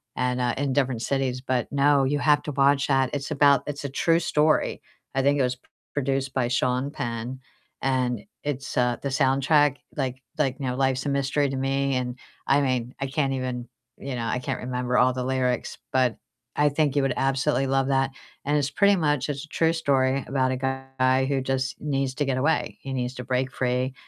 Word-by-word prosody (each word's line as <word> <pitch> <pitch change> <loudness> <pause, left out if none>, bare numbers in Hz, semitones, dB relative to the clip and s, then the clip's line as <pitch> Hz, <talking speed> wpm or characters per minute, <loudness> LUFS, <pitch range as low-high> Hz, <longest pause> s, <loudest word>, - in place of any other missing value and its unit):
and, 125 0 0
uh, 120 -1 +1
in 135 -1 0
different 130 -4 0
cities. 130 -2 -1
But 130 -2 -1
no, 140 0 +4
you 145 +2 0
have 150 0 +4
to 150 - -4
watch 140 0 +3
that, 135 -2 +2
it's 145 +1 -3
about 140 -1 +4
it's 145 -1 -5
a - - -2
true 165 +5 +2
story, 155 -2 +1 0.3
I 135 - +3
think 140 +1 +3
it - - +3
was 125 0 0
p - - -44 0.3
produced 135 -1 -1
by 130 -2 +1
Sean 125 +2 0
Penn, 120 0 -4 0.4
and 130 -2 0 0.2
it's, 140 -2 -4
uh, 125 -1 +3
the 140 - -2
soundtrack, 140 +1 +3 0.2
like 130 -2 -2 0.2
like, 135 -3 +1
you 135 - -3
know, 125 - -1
"Life's 130 -1 +1
a - - 0
Mystery 140 +1 +1
to 135 - -3
Me" 135 0 0
and 125 -1 -2 0.3
I 140 +1 +4
mean, 130 -2 -1
I 135 - 0
can't 135 0 0
even 125 -2 -3 0.3
you 135 0 -5
know, 120 - -3
I 125 - 0
can't 125 - -3
remember 125 0 -2
all 125 +1 +5
the 125 0 -3
lyrics, 130 -1 -1
but 130 -3 +2 0.4
I 145 0 +4
think 145 -1 +1
you 145 - +3
would 135 -2 +1
absolutely 135 +1 +1
love 135 0 +1
that. 135 0 +1 0.3
And 145 +2 +1
it's 140 -1 0
pretty 200 +6 +4
much 145 -6 +1
it's 140 0 -4
a - - -23
true 165 +1 +2
story 135 -4 +1
about 130 -1 +1
a 130 - -1 0.4
guy 130 +1 +3
who 135 0 0
just 130 0 -2
needs 135 -3 -1
to 145 - 0
get 135 -2 0
away, 150 +5 0
he 135 - -5
needs 125 0 -2
to 125 - -6
break 130 +1 0
free, 125 0 -1
135 Hz, 210 wpm, -25 LUFS, 130-140 Hz, 0.4 s, all